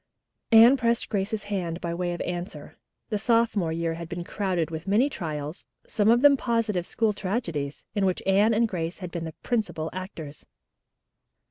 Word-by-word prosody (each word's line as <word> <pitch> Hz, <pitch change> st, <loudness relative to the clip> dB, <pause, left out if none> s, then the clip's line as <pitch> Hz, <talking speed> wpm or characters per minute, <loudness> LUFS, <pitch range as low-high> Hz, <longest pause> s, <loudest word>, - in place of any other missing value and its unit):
Anne 230 Hz, +4 st, +8 dB
pressed 235 Hz, -2 st, 0 dB
Grace's 205 Hz, +1 st, -1 dB
hand 180 Hz, -5 st, -3 dB
by 170 Hz, -1 st, -3 dB
way 175 Hz, 0 st, -2 dB
of 175 Hz, -, -4 dB
answer. 175 Hz, +2 st, -5 dB, 0.3 s
The 210 Hz, -3 st, -1 dB
sophomore 220 Hz, -6 st, +2 dB
year 165 Hz, 0 st, -1 dB
had 165 Hz, 0 st, -7 dB
been 175 Hz, +1 st, -4 dB
crowded 180 Hz, -4 st, -2 dB
with 160 Hz, +3 st, -6 dB
many 235 Hz, +9 st, +3 dB
trials, 150 Hz, -, -5 dB, 0.2 s
some 210 Hz, 0 st, +2 dB
of 240 Hz, +3 st, +4 dB
them 290 Hz, -1 st, +8 dB
positive 230 Hz, -8 st, 0 dB
school 225 Hz, -2 st, +1 dB
tragedies, 180 Hz, -, -3 dB
in 200 Hz, -2 st, +1 dB
which 185 Hz, -, -1 dB
Anne 205 Hz, +3 st, +4 dB
and 230 Hz, +1 st, +3 dB
Grace 170 Hz, -4 st, -3 dB
had 180 Hz, -4 st, -7 dB
been 170 Hz, -1 st, -4 dB
the 160 Hz, -, -7 dB
principal 210 Hz, -9 st, -1 dB
actors. 170 Hz, -6 st, -7 dB
190 Hz, 170 wpm, -26 LUFS, 170-220 Hz, 0.3 s, Anne